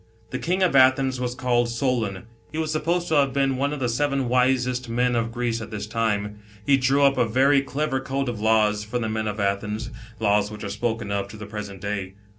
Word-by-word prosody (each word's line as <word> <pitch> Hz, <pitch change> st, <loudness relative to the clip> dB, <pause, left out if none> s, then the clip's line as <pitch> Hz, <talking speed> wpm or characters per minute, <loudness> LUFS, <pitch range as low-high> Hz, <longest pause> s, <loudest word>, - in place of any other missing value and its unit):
The 130 Hz, -, -3 dB
King 185 Hz, +3 st, 0 dB
of 180 Hz, -, +2 dB
Athens 130 Hz, 0 st, +4 dB
was 125 Hz, -1 st, -2 dB
called 120 Hz, -2 st, +1 dB
Solon; 115 Hz, -6 st, -1 dB, 0.3 s
he 155 Hz, -, -6 dB
was 160 Hz, -1 st, -1 dB
supposed 170 Hz, +3 st, 0 dB
to 155 Hz, -, +3 dB
have 140 Hz, -2 st, +3 dB
been 135 Hz, -1 st, +1 dB
one 140 Hz, +2 st, 0 dB
of 150 Hz, -, -4 dB
the 125 Hz, -, 0 dB
seven 135 Hz, +2 st, 0 dB
wisest 125 Hz, 0 st, +1 dB
men 125 Hz, +1 st, +1 dB
of 115 Hz, 0 st, 0 dB
Greece 120 Hz, -1 st, -2 dB
at 110 Hz, -, -7 dB
this 105 Hz, -2 st, -5 dB
time. 105 Hz, -2 st, -1 dB, 0.3 s
He 140 Hz, -, +5 dB
drew 135 Hz, +2 st, +2 dB
up 140 Hz, -1 st, +4 dB
a 120 Hz, -, +4 dB
very 135 Hz, +5 st, +4 dB
clever 140 Hz, 0 st, -2 dB
code 135 Hz, +1 st, -2 dB
of 120 Hz, -3 st, -3 dB
laws 105 Hz, -1 st, +3 dB
for 110 Hz, +4 st, -3 dB
the 115 Hz, -2 st, -2 dB
men 110 Hz, 0 st, -2 dB
of 105 Hz, 0 st, -3 dB
Athens, 105 Hz, +4 st, -2 dB, 0.3 s
lays 105 Hz, -1 st, +2 dB
which 105 Hz, 0 st, -8 dB
are 100 Hz, -, -4 dB
spoken 110 Hz, 0 st, -2 dB
of, 100 Hz, 0 st, -1 dB
to 100 Hz, -, -11 dB
the 105 Hz, -, -7 dB
present 100 Hz, -2 st, -7 dB
day. 100 Hz, -2 st, -4 dB
120 Hz, 230 wpm, -24 LUFS, 105-135 Hz, 0.3 s, He